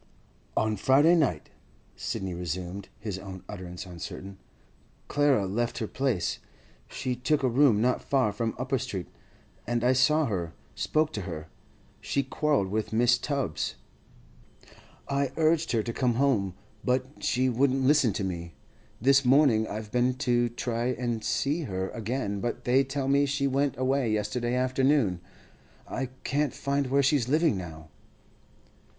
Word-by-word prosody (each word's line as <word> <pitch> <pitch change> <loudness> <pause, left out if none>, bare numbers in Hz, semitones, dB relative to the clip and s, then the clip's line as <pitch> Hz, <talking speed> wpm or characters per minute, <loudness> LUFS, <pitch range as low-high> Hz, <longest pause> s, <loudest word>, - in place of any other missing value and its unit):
'On 110 -1 +1
Friday 145 +6 +5
night,' 140 - +1 0.4
Sidney 95 -2 -4
resumed, 90 +3 -5
his 105 -3 -5
own 95 -1 -9
utterance 90 -3 -7
uncertain, 95 +2 -8 0.7
'Clara 145 -8 +3
left 115 +5 -1
her 115 - -1
place. 120 -7 -1 0.5
She 130 -1 -3
took 140 +4 0
a - - +4
room 120 -3 +4
not 125 +1 +2
far 130 -6 +1
from 110 +2 -2
Upper 130 +1 -1
Street, 100 -9 -4 0.6
and 120 0 0
I 125 +1 +4
saw 150 +5 +4
her, 85 -8 -3 0.2
spoke 155 - 0
to - - -3
her. 80 -1 -6 0.5
She'd 140 -2 -2
quarrelled 145 -11 +1
with 110 +2 -1
Mrs. 120 +2 +3
Tubbs. 140 - -2 1.3
I 140 -1 0
urged 160 0 +2
her 110 -2 +2
to 115 - -4
come 125 -2 +1
home, 115 -9 +1 0.3
but 130 +3 -1
she 130 +1 +2
wouldn't 130 +2 +2
listen 140 -4 +4
to 100 - -2
me. 85 -3 -5 0.4
This 135 +3 +4
morning 125 -4 +4
I've 105 0 -6
been 125 +1 +2
to 120 -2 +1
try 120 0 -2
and 120 -3 -2
see 150 +3 0
her 95 -3 -3
again, 115 -3 -3
but 120 - -3
they 130 +2 +4
tell 135 0 -3
me 140 +1 +3
she 140 0 0
went 140 0 +1
away 130 -2 +1
yesterday 120 +3 -1
afternoon. 130 - +2 0.7
I 130 - -3 0.2
can't 145 0 0
find 140 0 -1
where 140 +2 +3
she's 135 -3 +2
living 155 -2 +3
now. 80 -4 -8
125 Hz, 150 wpm, -28 LUFS, 105-140 Hz, 1.3 s, Friday